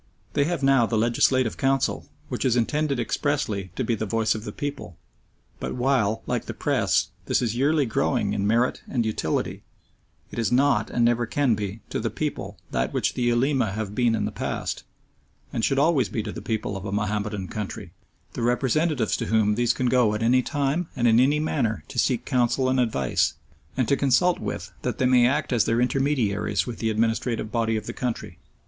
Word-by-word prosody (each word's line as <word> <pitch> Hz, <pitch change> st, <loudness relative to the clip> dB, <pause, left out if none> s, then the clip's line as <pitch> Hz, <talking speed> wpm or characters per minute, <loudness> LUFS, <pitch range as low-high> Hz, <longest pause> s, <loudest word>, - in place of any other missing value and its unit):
They 140 Hz, -, +2 dB
have 165 Hz, -3 st, -2 dB
now 135 Hz, -4 st, +4 dB
the 110 Hz, -, 0 dB
Legislative 120 Hz, +2 st, +2 dB
Council, 135 Hz, 0 st, 0 dB, 0.2 s
which -, -, -3 dB
is 125 Hz, -3 st, +2 dB
intended 140 Hz, +3 st, 0 dB
expressly 115 Hz, -6 st, -1 dB
to -, -, -1 dB
be 120 Hz, -, 0 dB
the 110 Hz, -1 st, -2 dB
voice 110 Hz, +1 st, +1 dB
of 110 Hz, 0 st, -6 dB
the -, -, -4 dB
people, 140 Hz, -, -6 dB, 0.6 s
but -, -, -4 dB
while, 125 Hz, -4 st, +1 dB
like -, -, -2 dB
the -, -, -6 dB
Press, -, -, +1 dB, 0.2 s
this -, -, +2 dB
is 120 Hz, -2 st, -1 dB
yearly 145 Hz, +3 st, +2 dB
growing 120 Hz, -3 st, 0 dB
in 100 Hz, -1 st, 0 dB
merit 115 Hz, +4 st, +1 dB
and 120 Hz, -3 st, 0 dB
utility, 110 Hz, -, -2 dB, 0.7 s
it -, -, -5 dB
is 115 Hz, -4 st, 0 dB
not, 140 Hz, +3 st, +3 dB
and 120 Hz, -, +1 dB
never 120 Hz, 0 st, +2 dB
can 140 Hz, -1 st, +2 dB
be, 105 Hz, 0 st, -4 dB
to -, -, -1 dB
the -, -, -1 dB
people -, -, -4 dB
that 60 Hz, +1 st, -1 dB
which -, -, 0 dB
the -, -, -4 dB
Ulema 120 Hz, -2 st, +2 dB
have 105 Hz, -1 st, -4 dB
been 120 Hz, 0 st, +2 dB
in 105 Hz, -, -1 dB
the -, -, -3 dB
past, -, -, -4 dB, 0.7 s
and 115 Hz, -, -2 dB
should 135 Hz, -, +2 dB
always 140 Hz, -3 st, +3 dB
be 110 Hz, -, -2 dB
to 105 Hz, -, -5 dB
the -, -, -7 dB
people 110 Hz, -3 st, -2 dB
of 95 Hz, -, -6 dB
a 100 Hz, -, -4 dB
Mahomedan 105 Hz, -1 st, -2 dB
country 105 Hz, -3 st, -6 dB, 0.4 s
the -, -, -4 dB
representatives 125 Hz, +2 st, +1 dB
to -, -, -3 dB
whom 110 Hz, -2 st, +3 dB
these 120 Hz, +2 st, +2 dB
can 130 Hz, -, -2 dB
go 120 Hz, -4 st, +3 dB
at 110 Hz, -, -2 dB
any 125 Hz, +3 st, +4 dB
time 145 Hz, +5 st, -1 dB
and 120 Hz, -, +2 dB
in 115 Hz, 0 st, +5 dB
any 140 Hz, +4 st, +3 dB
manner 130 Hz, -8 st, -1 dB
to 125 Hz, -, -3 dB
seek 125 Hz, -1 st, +1 dB
counsel 130 Hz, 0 st, +1 dB
and 130 Hz, 0 st, +2 dB
advice, 110 Hz, -, +1 dB, 0.4 s
and 130 Hz, -3 st, +1 dB
to 140 Hz, -, +3 dB
consult 145 Hz, +7 st, +2 dB
with -, -, -5 dB
that -, -, -2 dB
they 130 Hz, -, +1 dB
may 125 Hz, -1 st, +5 dB
act 130 Hz, -, 0 dB
as 115 Hz, -4 st, +3 dB
their 115 Hz, -, +1 dB
intermediaries 125 Hz, -5 st, +1 dB
with 120 Hz, -2 st, -6 dB
the 115 Hz, -, 0 dB
administrative 115 Hz, 0 st, 0 dB
body 115 Hz, -1 st, 0 dB
of 105 Hz, -, -5 dB
the 120 Hz, -, -5 dB
country. 125 Hz, -2 st, -4 dB
120 Hz, 205 wpm, -25 LUFS, 110-135 Hz, 0.7 s, in